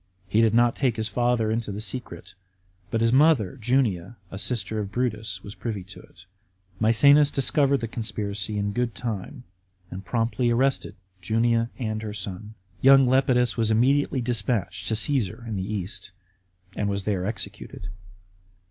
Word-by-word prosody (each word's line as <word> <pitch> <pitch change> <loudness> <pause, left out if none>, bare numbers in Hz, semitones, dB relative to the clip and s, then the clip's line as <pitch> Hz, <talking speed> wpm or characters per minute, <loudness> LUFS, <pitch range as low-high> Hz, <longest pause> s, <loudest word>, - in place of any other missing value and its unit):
He 105 +4 +2
did 115 -1 +3
not 120 0 +4
take 130 -4 +1
his 110 0 -1
father 120 0 +1
into 115 -2 -2
the 100 - -5
secret, 120 +3 -6 0.6
but 115 - -1
his 115 +1 +3
mother 135 - +3
Junia, 120 -5 0
a 95 - -6
sister 110 -1 -1
of 100 -2 -4
Brutus, 110 -5 -2
was 100 - -8
privy 105 -5 -5
to 95 +2 -12
it. 95 - -17 0.5
Maecenas 140 +7 +6
discovered 140 0 +1
the 115 - -2
conspiracy 105 -3 -3
in 100 0 -1
good 120 0 -1
time, 120 +3 -5 0.5
and 95 +2 -7
promptly 120 +4 0
arrested 130 +3 0 0.3
Junia 115 +4 +1
and 110 -3 -3
her 105 -1 -6
son. 105 +2 -6 0.3
Young 135 0 +7
Lepidus 125 -2 +2
was 115 -2 +1
immediately 130 +4 +2
despatched 115 -3 -1
to 110 - +1
Caesar 120 - 0
in 110 - -3
the 95 +2 -4
East, 100 -2 -4 0.7
and 100 - -1
was 100 0 -2
there 95 -3 -1
executed. 110 -4 -6
115 Hz, 155 wpm, -25 LUFS, 105-125 Hz, 0.7 s, Young